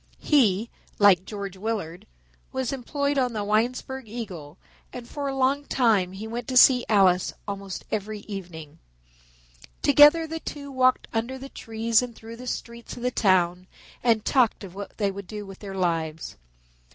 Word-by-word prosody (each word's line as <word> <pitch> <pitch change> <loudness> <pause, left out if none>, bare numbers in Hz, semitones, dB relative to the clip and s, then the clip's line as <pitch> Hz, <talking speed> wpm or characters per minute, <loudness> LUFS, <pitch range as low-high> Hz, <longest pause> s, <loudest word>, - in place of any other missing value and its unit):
He, 230 -7 +2 0.3
like 195 -3 +5
George 200 -3 -6
Willard, 195 -5 -4 0.4
was 260 0 -2
employed 280 +2 -1
on 250 -2 0
the 210 -2 -2
Winesburg 245 +4 -1
Eagle 185 -9 -7 0.3
and 245 -1 -8
for 285 +1 -4
a 270 - -2
long 270 +2 +1
time 210 -10 +2
he 200 +3 -7
went 235 +1 -5
to 255 - 0
see 250 -1 +7
Alice 190 -4 +4
almost 200 -2 -6
every 215 0 -3
evening. 170 -7 -9 1.0
Together 295 +3 +7
the 325 +1 -5
two 285 -3 -7
walked 255 -1 +2
under 235 +4 -2
the 270 +1 -9
trees 225 -1 0
through 225 +1 -10
the 250 +1 -9
streets 235 -1 -6
of 240 - -8
the 250 - +1
town 185 -4 +2 0.4
and 225 -3 +2
talked 245 -5 +2
of 185 -3 -9
what 200 +1 -8
they 200 -2 0
would 200 -1 -8
do 210 -1 -7
with 195 -1 -11
their 195 -2 -7
lives. 165 -3 -2
220 Hz, 165 wpm, -25 LUFS, 195-255 Hz, 1.0 s, see